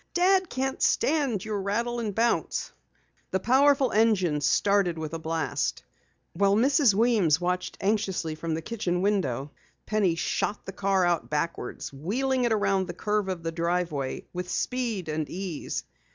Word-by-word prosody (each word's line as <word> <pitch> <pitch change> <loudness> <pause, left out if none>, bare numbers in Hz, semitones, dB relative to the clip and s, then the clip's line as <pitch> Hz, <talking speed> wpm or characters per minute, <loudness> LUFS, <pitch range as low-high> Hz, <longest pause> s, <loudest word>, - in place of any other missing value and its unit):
"Dad 370 +1 +3
can't 265 +1 -2
stand 275 - +1
your 210 -2 -2
rattle 235 +5 -1
and 215 -4 -3
bounce." 235 +2 0 0.6
The 190 - 0
powerful 270 +4 +4
engine 190 -9 +2
started 190 +3 +2
with 160 0 -5
a 165 - -3
blast. 160 0 -2 0.5
While 200 0 +3
Mrs. 265 -1 +4
Weems 210 -9 +3
watched 180 +1 -2
anxiously 195 -5 0
from 160 +1 -3
the 160 - -5
kitchen 180 -4 -2
window, 145 - 0 0.3
Penny 205 -6 +1
shot 205 +4 -2
the - - -5
car 195 -1 +1
out 175 -2 0
backwards, 150 -3 -3
wheeling 250 - 0
it 240 - +1
around 195 -3 +1
the 175 - -6
curve 210 0 -1
of 180 -3 -4
the 165 - -2
driveway 170 -5 -2
with 180 0 -4
speed 235 -8 -2
and 155 -1 -2
ease. 180 -4 -4
195 Hz, 150 wpm, -27 LUFS, 170-230 Hz, 0.6 s, powerful